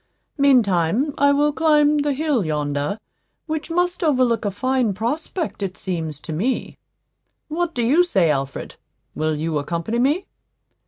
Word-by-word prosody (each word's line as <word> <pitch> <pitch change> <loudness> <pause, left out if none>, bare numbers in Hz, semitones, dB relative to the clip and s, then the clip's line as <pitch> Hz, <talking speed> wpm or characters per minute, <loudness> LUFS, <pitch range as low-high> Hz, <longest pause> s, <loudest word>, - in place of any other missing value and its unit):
Meantime 245 - +3
I 285 0 +4
will 295 +1 +2
climb 300 -1 +3
the 290 0 +1
hill 285 -5 0
yonder, 150 +3 -2 0.5
which 315 0 -4
must 355 +2 0
overlook 255 -7 +2
a - - +2
fine 245 +1 0
prospect, 290 - -3
it 190 -1 -3
seems 160 -5 -4
to 160 - -6
me. 230 +12 -2 0.7
What 335 +2 -2
do 240 - 0
you 295 +10 +4
say, 190 - +2
Alfred? 135 -1 -4 0.4
Will 155 0 -1
you 155 0 -1
accompany 170 +10 -2
me?" 295 +9 +1
245 Hz, 145 wpm, -21 LUFS, -, 0.7 s, I